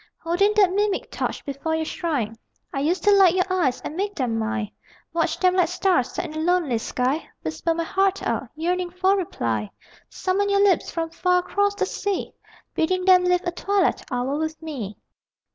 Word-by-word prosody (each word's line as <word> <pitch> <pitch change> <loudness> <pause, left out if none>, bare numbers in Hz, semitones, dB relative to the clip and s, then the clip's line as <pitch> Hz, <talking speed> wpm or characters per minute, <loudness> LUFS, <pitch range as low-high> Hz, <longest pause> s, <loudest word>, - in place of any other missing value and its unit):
Holding 365 +5 +2
that 390 -4 +4
mimic 410 0 0
torch - - -3
before 285 +3 -2
your 320 0 -1
shrine 295 - -2 0.4
I 275 - -1
used 325 +7 0
to 415 - +5
light 385 -3 +6
your 370 -1 +2
eyes 335 -9 +1
and 305 - -6
make 405 +3 -2
them 240 -5 -1
mine; 220 -1 -2 0.4
Watch 330 -1 0
them 365 -1 +3
like 365 -2 +3
stars 360 -10 +1
set - - -3
in 315 - -7
a 310 - -4
lonely 325 -8 +1
sky, 255 +6 -1
Whisper 160 - -1
my 335 - -1
heart 390 +3 +1
out, - - -1
yearning 355 +3 -1
for 370 +2 +2
reply; 115 - -2 0.4
Summon 395 +2 0
your 400 0 +4
lips 390 -4 +3
from 330 -1 -3
far 360 +2 +2
across 405 +2 0
the - - 0
sea 405 -2 -3 0.4
Bidding 365 +3 0
them 365 -1 +6
live 360 0 +3
a 350 - 0
twilight 395 +2 +1
hour 255 +4 -1
with 315 0 -3
me. 260 -11 -6
345 Hz, 190 wpm, -24 LUFS, 285-375 Hz, 0.4 s, light